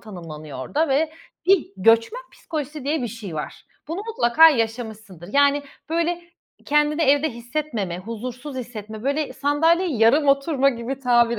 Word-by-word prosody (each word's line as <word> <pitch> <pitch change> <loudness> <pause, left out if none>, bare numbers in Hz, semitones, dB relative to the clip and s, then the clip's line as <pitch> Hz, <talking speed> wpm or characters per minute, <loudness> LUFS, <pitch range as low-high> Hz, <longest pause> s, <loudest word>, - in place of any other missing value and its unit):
tanımlanıyor 155 - -9
orada 300 - -1
ve 305 +4 +1 0.3
bir 380 -3 +4
göçmen 230 - +3
psikolojisi 300 -2 -6
diye 295 0 0
bir 240 - -2
şey 215 -7 -8
var. 150 - -6 0.2
Bunu 335 +5 -3
mutlaka 325 - +6
yaşamışsındır, 220 - -3
yani, 285 0 +4 0.3
böyle 335 +1 0 0.4
kendini 300 +2 +2
evde 290 +1 +3
hissetmeme 235 - -4
huzursuz 245 +7 -7
hissetme 220 -3 -7
böyle 285 +3 -1
sandalyeyi 320 +1 +1
yarım 275 +7 +4
oturma 275 0 +3
gibi 245 +2 -5
tabir 240 -3 +3
265 Hz, 135 wpm, -23 LUFS, 225-300 Hz, 0.4 s, mutlaka